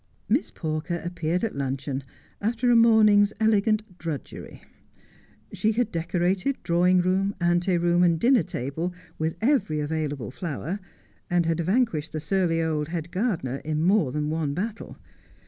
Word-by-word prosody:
Miss - - +1
Pawker 160 +2 -3
appeared 175 +1 -2
at 225 - -2
luncheon 135 0 -3 0.4
after 235 +3 +1
a - - +5
morning's 215 -3 +5
elegant 215 -3 +1
drudgery. 160 -5 -7 0.9
She 220 +1 +1
had 230 0 0
decorated 180 +9 0
drawing 180 +2 +3
room, 190 +2 0
ante 175 +1 +2
room, 175 +1 +2
and 170 -2 +3
dinner 250 +2 +4
table 160 +5 -4 0.2
with 160 +1 -1
every 220 - +2
available 145 -5 -3
flower, 165 +5 -4 0.5
and 175 -1 +2
had 165 0 0
vanquished 175 -4 0
the 155 - -2
surly 165 0 +1
old 155 -2 -1
head 165 0 -5
gardener 180 - -1
in 155 +2 -2
more 185 -6 +3
than 150 +1 -2
one 155 -3 -1
battle. 215 +5 -5
175 Hz, 145 wpm, -25 LUFS, 155-205 Hz, 0.9 s, a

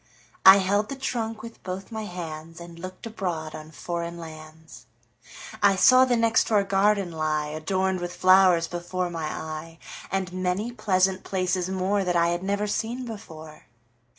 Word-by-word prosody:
I 190 +1 +11
held 200 +2 +1
the 275 - -4
trunk 225 -4 -3
with 230 0 -10
both 190 +3 -6
my 220 -1 -5
handsAnd 170 -1 -8
looked 185 +4 -8
abroad 175 -8 -4
on 155 0 -9
foreign 170 +1 -5
lands.I 160 +4 -5
saw 255 +7 +6
the 250 -1 +2
next 230 -1 +3
door 210 -3 +3
garden 195 -1 +2
lie, 155 -2 -1
Adorned 185 +5 -1
with 175 0 -5
flowers, 185 -2 +5
before 175 +1 -3
my 165 -2 -4
eye, 160 +1 -6 0.3
And 190 -1 -2
many 185 +5 -1
pleasant 190 -4 +1
places 185 -1 -1
moreThat 190 -1 0
I 170 0 +3
had 175 0 -1
never 200 +2 -1
seen 235 +4 -3
before. 160 -9 -10
185 Hz, 150 wpm, -25 LUFS, 165-200 Hz, 0.3 s, I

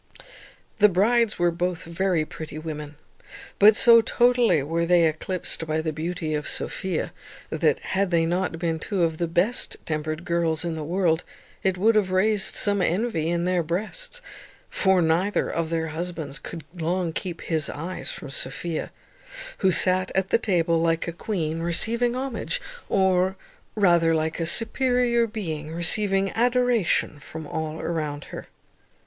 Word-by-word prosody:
The 210 0 +7
brides 220 +4 +2
were 175 0 +2
both 175 0 -2
very 170 -1 0
pretty 155 -1 -8
women; 150 -1 -6 0.6
but 210 +1 +8
so 230 -1 +7
totally 240 - +3
were 165 +3 -1
they 175 -1 +5
eclipsed 160 +1 -2
by 155 0 0
the 160 0 -2
beauty 160 0 -3
of 150 -1 -2
Sophia, 190 -1 -3 0.4
that, - - +2
had 195 0 -1
they 165 -2 +2
not 175 0 -1
been 165 -1 -2
two 190 +1 -1
of 160 -1 0
the 170 - 0
best 180 +9 0
tempered 155 +1 -3
girls 170 -1 0
in 170 - -2
the 160 -1 -5
world, 170 0 +1 0.4
it 190 -1 0
would 220 +5 +4
have 210 -3 +2
raised 195 +2 +2
some 200 -1 +3
envy 180 -3 0
in 170 0 0
their 180 -1 +1
breasts; 220 - -4 0.5
for 190 -3 +3
neither 170 +6 +1
of 165 -1 -2
their 165 -1 -1
husbands 160 -3 -4
could 165 -3 -8
long 175 0 -2
keep 170 -1 -5
his 160 -2 -2
eyes 170 +5 -5
from 140 - -7
Sophia, 155 +5 -3 0.7
who 190 - +3
sat 185 +1 +3
at 190 0 0
the - - +4
table 170 -6 +1
like 165 0 0
a 170 - -3
queen 165 -4 -3
receiving 230 +8 +1
homage, 260 -2 -3 0.3
or, 190 -1 +2 0.4
rather, 170 -5 +4
like 160 +1 -1
a 165 - 0
superior 235 +2 +2
being 160 -9 -5
receiving 195 +3 +1
adoration 245 - +1
from 160 +2 -8
all 160 +1 -4
around 150 -3 -3
her. - - -7
175 Hz, 155 wpm, -24 LUFS, 160-200 Hz, 0.7 s, but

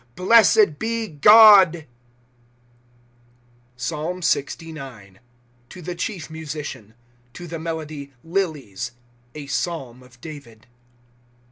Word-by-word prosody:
Blessed 205 -4 +4
be 230 0 -2
God! 195 -1 +7 1.9
PSALM 165 +6 -4
LXIX. 135 - -4 0.5
To 185 - -12
the 180 - -5
chief 175 -1 -5
Musician. 150 -9 -8 0.4
To 175 - -10
[the 165 -1 -7
melody] 155 -3 -6
" - - -38
Lilies," 150 - -4 0.4
[A 150 -2 -8
Pealm] 135 -5 -4
of 125 -1 -20
David. 135 -7 -12
160 Hz, 95 wpm, -22 LUFS, 135-180 Hz, 1.9 s, God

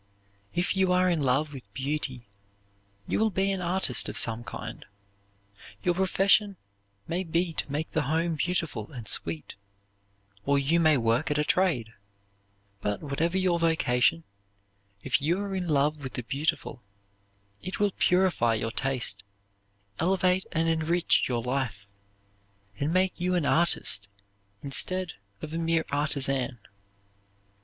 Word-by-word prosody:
If 175 +3 0
you 190 -1 +2
are 180 0 +3
in 165 -3 0
love 140 +3 +1
with 125 -7 -11
beauty 135 -3 -3 0.8
you - - 0
will 220 0 +3
be 195 0 0
an 190 -2 -2
artist 175 -7 +1
of - - -5
some 115 0 +3
kind. - - -7 1.0
Your 175 - +2
profession 195 +2 +2 0.5
may 175 +3 -1
be 170 0 -1
to 145 - -3
make 150 +3 -3
the 160 - +1
home 165 +3 0
beautiful 160 - -2
and 120 -6 -8
sweet, 80 -5 +1 0.9
or 140 0 +2
you 145 +5 +2
may 155 -3 +4
work 115 +5 +1
at 150 - 0
a 150 - +2
trade; 150 -10 +1 0.9
but 105 +5 -2
whatever 160 +5 -1
your 185 -2 +2
vocation, 165 -2 +2 0.8
if - - +1
you 170 +6 +1
are 200 -1 -4
in 185 -2 -2
love 150 0 +1
with 130 -2 -6
the 125 - -4
beautiful, 140 0 -2 0.8
it 185 - -6
will 205 -1 +2
purify 180 -11 +3
your 115 +1 -2
taste, 135 -3 +1 0.8
elevate 185 +1 +2
and 165 0 0
enrich 165 +2 +2
your 120 -2 -1
life, 125 -6 -2 0.9
and 145 +3 0
make 185 +1 +2
you 180 +1 0
an 170 -5 +1
artist 160 -11 +3 0.6
instead 180 +5 +1 0.3
of 155 - -6
a 165 - -2
mere 165 -1 +1
artisan. 135 -3 0
160 Hz, 140 wpm, -27 LUFS, 135-180 Hz, 1.0 s, may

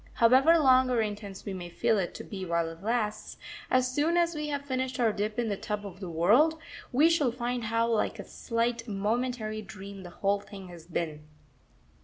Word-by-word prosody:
However 265 +8 +6
long 260 -4 +5
or 245 -2 +2
intense 205 -2 -4
we 200 - -4
may 175 -2 -6
feel 210 +4 +1
it 180 - -3
to - - -7
be 195 -2 -7
while 170 -2 0
it 165 +1 -11
lasts, 215 -1 -2 0.3
as 255 0 +2
soon 315 +5 +2
as 340 0 +2
we 300 -1 -3
have 285 -1 -3
finished 260 -1 -2
our 225 -3 +3
dip 210 +2 -2
in 240 -1 0
the 205 - -1
tub 205 +1 -4
of 190 -2 -9
the 185 -3 -6
world, 220 - +4 0.3
we 290 +6 +5
shall 310 -7 +2
find 240 0 -3
how 230 +1 +1
like 230 -2 0
a - - -6
slight, 230 0 -2
momentary 215 +1 -2
dream 200 -1 -9
the 180 - -9
whole 200 +3 0
thing 195 -2 -11
has 170 -2 -12
been.... 155 -3 -4
220 Hz, 205 wpm, -29 LUFS, 195-255 Hz, 0.3 s, However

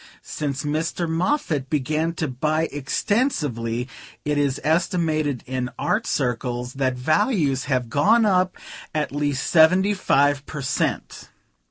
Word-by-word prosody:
Since 140 -2 -3
Mr. 160 +3 -1
Moffatt 160 - -1
began 155 +3 0
to 160 -1 -2
buy 155 +5 0
extensively 140 - -1 0.4
it 150 0 +1
is 140 -2 0
estimated 155 - 0
in 130 -1 -3
art 220 +2 0
circles 125 -1 -2
that 130 -2 0
values 155 - +1
have 130 -3 0
gone 210 - +3
up 185 -2 +2 0.4
at 150 -1 -1
least 145 -2 -1
seventy 185 +5 +5
five 145 -6 +2
per 150 -3 -6
cent.'" 130 - -2
150 Hz, 125 wpm, -23 LUFS, 130-165 Hz, 0.4 s, seventy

